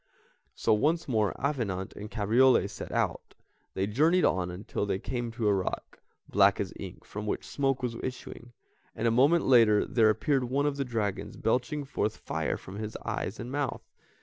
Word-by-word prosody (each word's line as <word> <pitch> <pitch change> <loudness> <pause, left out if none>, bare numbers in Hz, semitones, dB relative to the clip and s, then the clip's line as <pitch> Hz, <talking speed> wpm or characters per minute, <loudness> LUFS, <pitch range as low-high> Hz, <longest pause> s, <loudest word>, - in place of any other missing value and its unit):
So - - +2
once 160 +10 +1
more 110 -6 +1
Avenant 115 -10 -2
and 105 +1 -8
Cabriole 115 +3 +4
set 100 - -8
out; - - -2 0.4
they 95 - 0
journeyed 155 - +3
on 90 -1 +1
until 100 +3 -4
they 95 -2 0
came 120 +3 -4
to 115 -2 -1
a 105 - +4
rock, 95 -2 -3 0.3
black - - +4
as - - -3
ink, - - -8
from 105 +1 -6
which - - -2
smoke 135 -2 -1
was 120 -2 -2
issuing, 125 -1 -7 0.4
and - - 0
a - - +3
moment 140 +8 +4
later 115 -5 +5
there 110 -3 +3
appeared 130 +4 +1
one 135 +4 0
of 145 -1 0
the 140 - -1
dragons 105 -4 -3
belching 130 +5 0
forth 110 -5 -2
fire 80 0 -2
from 95 +2 -10
his 110 0 -5
eyes 100 - -3
and 120 +1 -6
mouth. 145 -2 -2
115 Hz, 180 wpm, -29 LUFS, 105-135 Hz, 0.4 s, later